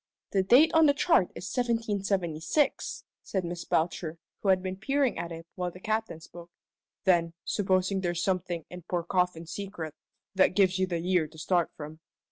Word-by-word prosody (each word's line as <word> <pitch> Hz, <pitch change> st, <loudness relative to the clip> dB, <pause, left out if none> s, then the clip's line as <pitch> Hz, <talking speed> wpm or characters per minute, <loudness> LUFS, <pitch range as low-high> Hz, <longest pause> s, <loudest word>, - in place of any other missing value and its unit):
"The 195 Hz, -, +3 dB
date 250 Hz, +11 st, +6 dB
on 320 Hz, -1 st, +6 dB
this 285 Hz, -, +4 dB
chart 295 Hz, -, +3 dB
is 180 Hz, -, -7 dB
1776," 205 Hz, -, 0 dB, 0.2 s
said 190 Hz, -3 st, -2 dB
Miss 170 Hz, 0 st, -5 dB
Belcher, 165 Hz, 0 st, -1 dB, 0.2 s
who 200 Hz, -, -1 dB
had 185 Hz, -1 st, +4 dB
been 185 Hz, 0 st, -3 dB
peering 270 Hz, +5 st, +1 dB
at 170 Hz, -, -4 dB
it 165 Hz, 0 st, -8 dB
while 180 Hz, -1 st, -2 dB
the 180 Hz, -, -12 dB
Captain 215 Hz, -4 st, -2 dB
spoke. 170 Hz, +1 st, -12 dB, 0.5 s
"Then, 170 Hz, -4 st, +3 dB
supposing 190 Hz, -1 st, +1 dB
there's 175 Hz, -2 st, -1 dB
something 180 Hz, -3 st, -1 dB
in 180 Hz, 0 st, -8 dB
poor 175 Hz, +1 st, -2 dB
Coffin's 175 Hz, -2 st, -1 dB
secret, 190 Hz, -6 st, -5 dB, 0.4 s
that 190 Hz, -1 st, +3 dB
gives 190 Hz, -2 st, +3 dB
you 185 Hz, -, +2 dB
the 175 Hz, -2 st, -1 dB
year 175 Hz, -1 st, +1 dB
to 155 Hz, +1 st, -17 dB
start 170 Hz, +2 st, +1 dB
from. 155 Hz, +1 st, -8 dB
185 Hz, 175 wpm, -29 LUFS, 170-200 Hz, 0.5 s, date